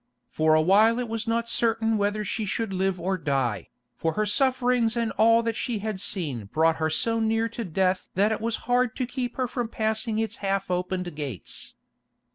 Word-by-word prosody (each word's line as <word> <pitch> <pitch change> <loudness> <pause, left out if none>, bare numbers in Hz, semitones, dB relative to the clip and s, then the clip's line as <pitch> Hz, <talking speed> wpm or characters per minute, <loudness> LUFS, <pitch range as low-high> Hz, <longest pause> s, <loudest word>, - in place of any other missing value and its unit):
For 155 0 +2
a 155 - +4
while 215 +6 +5
it 250 -1 -2
was 225 0 -3
not 230 0 0
certain 225 -1 +2
whether 205 0 0
she 220 +3 -2
should 215 0 -2
live 190 0 0
or 185 +2 -1
die, 135 -8 -1 0.2
for 160 +5 -2
her 215 +4 0
sufferings 250 0 +2
and 230 -1 0
all 230 +1 +4
that 230 -1 -1
she 240 -2 -2
had 210 -1 -4
seen 145 - -1
brought 160 +9 +2
her 160 0 0
so 230 +7 +1
near 225 0 +1
to 235 +1 -5
death 185 0 0
that 205 +4 +3
it 220 - -2
was 230 0 0
hard 245 -1 +1
to 255 - -1
keep 245 -1 -4
her 255 -1 0
from 245 -1 -3
passing 220 0 -1
its 220 0 -2
half 195 -1 -2
opened 180 -1 -2
gates. 140 - -6
215 Hz, 200 wpm, -26 LUFS, 180-230 Hz, 0.2 s, while